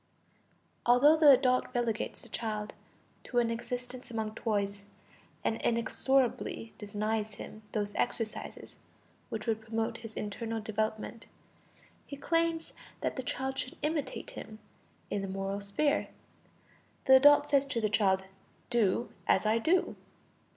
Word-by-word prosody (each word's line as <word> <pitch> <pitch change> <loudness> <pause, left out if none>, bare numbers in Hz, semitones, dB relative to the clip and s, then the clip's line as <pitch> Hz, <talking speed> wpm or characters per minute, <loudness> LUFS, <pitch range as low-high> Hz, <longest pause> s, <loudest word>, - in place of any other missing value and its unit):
Although 250 +6 +6
the 310 -2 +7
adult 255 -2 +5
relegates 235 -2 -1
the - - -11
child 215 -2 -3 0.5
to 245 - -4
an 235 -1 +3
existence 245 +2 -5
among 220 -2 -3
toys, 200 -3 -2 0.6
and 225 - 0
inexorably 235 0 +1
denies 210 0 -2
him 215 - -9
those 205 -1 -2
exercises 225 -3 -3 0.5
which 215 - -4
would 220 -2 0
promote 225 0 -2
his 225 -1 -10
internal 225 +2 -3
development, 220 +1 -3 0.8
he 280 - -7
claims 330 +2 0 0.3
that - - -1
the 260 - -2
child 265 +1 -3
should 295 +7 -5
imitate 300 -3 -2
him 215 - -9 0.5
in 205 - 0
the 195 - -3
moral 195 +1 -3
sphere. 245 +9 +1 1.0
The 265 -1 +9
adult 290 +2 +7
says 280 -1 +3
to 260 -4 -1
the 215 - +2
child: 195 -2 +2 0.5
"Do 235 -1 +2 0.2
as - - +3
I 220 +2 +3
do." 350 +9 +2
230 Hz, 130 wpm, -31 LUFS, 215-265 Hz, 1.0 s, The